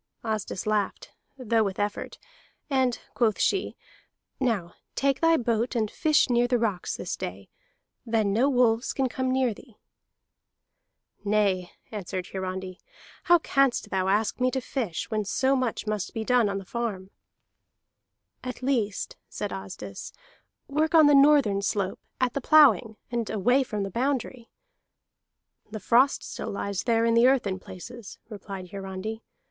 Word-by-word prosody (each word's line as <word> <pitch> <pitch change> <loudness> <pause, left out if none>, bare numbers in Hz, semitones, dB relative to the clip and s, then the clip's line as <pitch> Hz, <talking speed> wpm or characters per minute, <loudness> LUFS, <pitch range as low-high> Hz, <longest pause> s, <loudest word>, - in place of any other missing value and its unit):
Asdis 215 -4 -3
laughed, 210 -2 -1 0.3
though 230 -3 +1
with 195 -2 -3
effort, 205 0 -3 0.5
and 260 -3 +2
quoth 225 -4 +1
she: 390 - +1 0.6
"Now 220 -10 -1 0.2
take 275 -1 +1
thy 330 0 +5
boat 235 0 0
and 215 -3 0
fish 310 -2 +3
near 245 -1 +2
the 245 0 +2
rocks 215 -6 -2
this 180 - -4
day. 95 +2 -7 0.5
Then 220 -4 +1
no 250 +7 +3
wolves 245 -3 +2
can 265 -1 +1
come 260 +1 -2
near 260 -3 +2
thee." 230 +1 -17 1.5
"Nay," 200 -4 +1 0.2
answered 185 -3 -5
Hiarandi, 185 0 -5 0.5
"how 345 - +7
canst 275 -5 +1
thou 190 -1 0
ask 205 +4 +1
me 255 0 +3
to 265 - -1
fish 235 - -4
when 215 -1 0
so 260 +7 +1
much 255 -5 -1
must 210 -2 -3
be 225 - -2
done 240 -2 +3
on 200 - -2
the 195 - -7
farm?" 200 -4 -4 1.3
"At 255 0 -6
least," 230 -7 -1
said - - -4
Asdis, - - -7 0.6
"work 310 +3 +1
on 315 -2 +8
the 290 - +6
northern 275 -8 +5
slope, 200 -1 -1 0.2
at 255 -1 +1
the 280 - -2
ploughing, 240 - +5
and 235 -2 -2
away 245 +6 +2
from 215 -6 -3
the 195 - -4
boundary." 255 0 -2 1.2
"The 215 0 -6
frost 245 +7 +3
still - - -6
lies 200 -1 -3
there 230 -1 +2
in 230 - +3
the 235 +2 +6
earth 265 -3 +3
in 190 -1 -2
places," 225 +5 -10
replied 195 -3 -8
Hiarandi. 195 +3 -5
225 Hz, 150 wpm, -26 LUFS, 200-255 Hz, 1.5 s, on